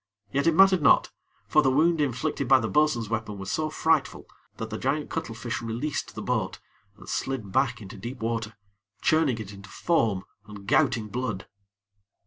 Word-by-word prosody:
Yet 140 +3 +1
it 165 - +4
mattered 190 -1 +6
not; 140 - +5 0.4
for 150 - +4
the 135 - +3
wound 160 +4 +3
inflicted 135 0 -1
by 135 +1 +6
the 115 - -2
bo'sun's 150 -5 +2
weapon 110 -2 -3
was 95 -1 -5
so 155 0 -1
frightful, 160 -1 +1 0.3
that 110 0 -5
the 110 - -4
giant 145 +3 -1
cuttlefish 115 +1 -4
released 120 +6 -3
the - - -5
boat, - - -1 0.4
and - - -14
slid 130 -7 -3
back 120 0 +1
into 95 - -10
deep 125 +2 -7
water, 115 -1 -3 0.5
churning 155 -7 +3
it 105 -2 -7
into 100 +1 -12
foam, 110 - +1 0.2
and 105 -2 -10
gouting 110 +2 +2
blood. 115 -4 -3
120 Hz, 170 wpm, -26 LUFS, 110-150 Hz, 0.5 s, mattered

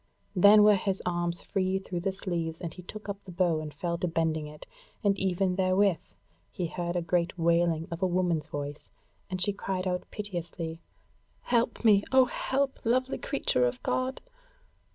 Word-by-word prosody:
Then 205 +3 +8
were 210 0 +7
his 195 0 -1
arms 175 -1 -1
free 190 -1 0
through 190 -2 -4
the 195 +3 -1
sleeves, 170 -4 -3
and 170 -2 -5
he 180 - -10
took 210 +4 -9
up 200 0 -5
the 185 - -10
bow 170 -3 +1
and 155 -1 -6
fell 170 +4 -3
to 180 - 0
bending 160 -2 0
it, 150 0 -11 0.4
and 200 -1 +3
even 185 0 0
therewith 190 -1 +3 0.5
he 180 - -3
heard 175 +1 -3
a 175 - 0
great 170 +1 0
wailing 170 -1 +2
of 170 +1 -5
a 190 - +3
woman's 175 -4 0
voice, 145 -1 -6 0.4
and 185 -1 -3
she 200 +3 +3
cried 190 -2 -3
out, 180 0 -2
piteously: 170 -5 -5 0.6
"Help 235 0 0
me, 205 -2 +6
O 260 -1 +6
help, 270 +2 -1
lovely 255 +3 +1
creature 125 - +1
of 125 0 -5
God!" 255 +1 -1
180 Hz, 175 wpm, -29 LUFS, 165-200 Hz, 0.6 s, Then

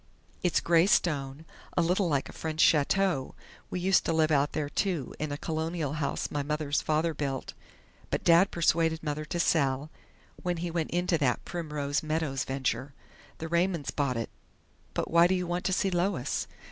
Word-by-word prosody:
It's 180 - +2
grey 170 +1 +4
stone, 145 -6 +1 0.3
a 175 - +4
little 180 +2 +1
like 140 -3 0
a - - -11
French 160 -1 -5
chateau. 160 -1 +3 0.3
We 180 - -3
used 190 +2 +3
to - - +1
live 160 -1 +2
out 145 0 +2
there, 150 - -1
too, 165 -3 -2
in 155 -1 -2
a 145 - -3
Colonial 160 -1 -2
house 150 -2 -2
my 145 - -1
mother's 150 0 -1
father 155 +2 +1
built, 140 -3 -3 0.6
but - - -2
Dad 170 +3 +6
persuaded 165 -1 +1
Mother 150 0 -3
to 170 +3 -3
sell, 145 -3 +1 0.5
when 180 -1 -1
he 170 +1 -3
went 165 -2 -1
into 175 -1 +1
that 125 -5 0
Primrose 150 -4 -2
Meadows 155 -4 -1
venture. 135 +1 -2 0.4
The 160 - -5
Raymonds 170 -2 0
bought 140 -4 -1
it.... 115 - -4 0.6
But - - -2
why 170 +1 +6
do 185 - +2
you 180 -1 -1
want 175 +1 -3
to - - +1
see 195 0 +1
Lois?" 175 -6 -1
160 Hz, 180 wpm, -29 LUFS, 145-175 Hz, 0.6 s, Dad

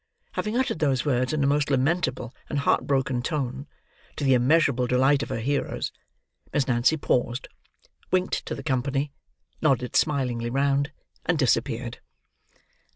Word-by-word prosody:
Having 215 +3 -2
uttered 260 -10 0
those 135 -5 +1
words 130 -2 +1
in 150 -2 0
a - - +3
most 145 +1 +2
lamentable 135 -2 0 0.2
and 145 - -2
heart 140 - +2
broken 135 -3 +1
tone: 135 -1 -3 0.5
to - - -4
the 135 -1 +4
immeasurable 130 0 +3
delight 135 +3 +3
of - - -4
her - - -2
hearers: 140 +4 -1 0.6
Miss 140 -3 +1
Nancy 125 +5 +3
paused, 125 -3 0 0.6
winked 185 0 0
to - - -3
the - - -8
company, 140 0 -1 0.5
nodded 130 -5 +1
smilingly 125 -6 +1
round, 140 +3 +1 0.4
and 170 -1 +2
disappeared. 120 -2 0
135 Hz, 145 wpm, -26 LUFS, 125-145 Hz, 0.6 s, the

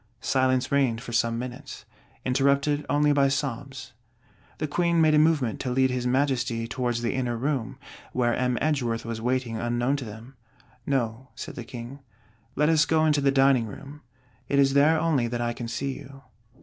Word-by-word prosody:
Silence 130 -1 +1
reigned 135 -5 +2
for 120 0 -8
some 115 -1 +1
minutes; 125 +3 -7 0.4
interrupted 140 +3 +2
only 145 0 +3
by 140 -1 +4
sobs. 135 -1 -4 0.6
The - - -2
Queen 170 +2 +1
made 155 -1 +4
a 150 - +5
movement 150 -8 +2
to 130 - -3
lead 130 +1 +2
his 125 -1 -2
Majesty 125 -3 0
towards 120 -2 -2
the 115 - 0
inner 125 -3 -1
room, 130 -2 -2 0.3
where 120 -1 +1
M. 125 -1 0
Edgeworth 125 -7 -1
was 115 -1 -4
waiting 125 -1 -1
unknown 120 +4 0
to 135 - -6
them: 110 +4 -10 0.5
'No', 130 -2 -1
said - - -7
the 120 - -7
King, 120 +3 -9 0.6
'let 150 +1 +2
us 155 -2 +4
go 160 -1 +3
into 150 -2 +2
the 140 - +3
dining 135 -3 +3
room; 140 +8 -10 0.5
it 140 - +1
is 135 -1 +4
there 150 +3 +4
only 155 -7 +1
that 120 +1 -3
I 120 0 -1
can 120 0 -6
see 130 +4 -3
you.' 135 0 -13
130 Hz, 180 wpm, -26 LUFS, 120-140 Hz, 0.6 s, a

